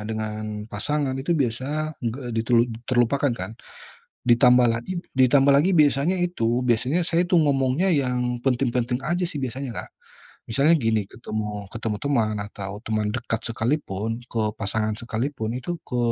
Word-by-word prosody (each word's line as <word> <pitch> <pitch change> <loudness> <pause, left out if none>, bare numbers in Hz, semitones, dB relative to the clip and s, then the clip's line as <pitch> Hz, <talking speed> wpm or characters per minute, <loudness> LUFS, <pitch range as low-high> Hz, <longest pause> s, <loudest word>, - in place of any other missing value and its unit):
dengan 110 -1 -4
pasangan 140 +5 -1
itu 170 +6 0
biasanya 140 +4 -1
enggak 120 +3 -3
di 115 - +2
telu 120 -1 +5 0.3
terlupakan 130 +2 +2
kan. 95 0 -6 0.8
Ditambah 125 0 +6
lagi 120 +11 -3 0.2
ditambah 135 +2 +5
lagi 170 +7 +4
biasanya 150 +3 +3
itu, 120 -9 0
biasanya 125 +9 +2
saya 170 +1 +2
tuh 175 - +5
ngomongnya 140 +5 +2
yang 125 -4 0
penting-penting 125 -1 +1
aja 175 +2 0
sih 150 - -5
biasanya 130 0 -4
Kak. - - -6 0.6
Misalnya 140 +8 +4
gini, 110 -4 +1
ketemu 105 -3 -5
ketemu 110 -2 -2
teman 115 -7 +1
atau 100 -1 -6
teman 110 -1 0
dekat 115 -2 -2
sekalipun, 115 -3 -1
ke 115 - -1 0.2
pasangan 110 +1 -1
sekalipun 120 0 -3
itu 175 +7 -4
ke 125 - -2
125 Hz, 145 wpm, -24 LUFS, 110-140 Hz, 0.8 s, Ditambah